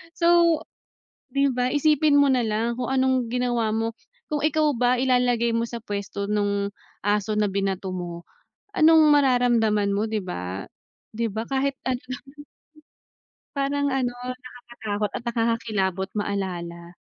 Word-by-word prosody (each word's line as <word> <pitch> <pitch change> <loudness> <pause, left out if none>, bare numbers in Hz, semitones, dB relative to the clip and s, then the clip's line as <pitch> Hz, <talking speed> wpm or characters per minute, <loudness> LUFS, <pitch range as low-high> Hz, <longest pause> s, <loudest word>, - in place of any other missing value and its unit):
So, 340 -2 +4 0.7
di 275 0 +3
ba 250 0 0
isipin 300 0 +3
mo 285 -1 +5
nalang 230 -1 0
kung 245 - -2
anong 260 -2 +2
ginawa 240 -3 0
mo 225 +1 -1 0.4
kung 295 - 0
ikaw 310 0 +3
ba 250 +1 +3
ilalagay 245 -2 +2
mo 230 - +1
sa 235 0 -6
pwesto 200 -2 -4
nung 200 -1 0 0.4
aso 205 +1 +1
na 210 - +3
binato 195 -1 -2
mo, 175 -1 -6 0.5
anong 320 0 +6
mararamdaman 240 -7 +3
mo 205 +2 0
di 220 - -1
ba? 95 - -5 0.5
Di 230 +1 -1
ba 220 +3 -4
kahit 270 0 0
ano 255 -1 -1
lang. 255 - -6 1.3
Parang 285 +1 0
ano 245 -2 -1 0.2
nakaka-takot 240 -5 -5
at - - -5
nakaka-kilabot 215 -5 0
maalala. 175 -4 -4
235 Hz, 135 wpm, -24 LUFS, 205-260 Hz, 1.3 s, anong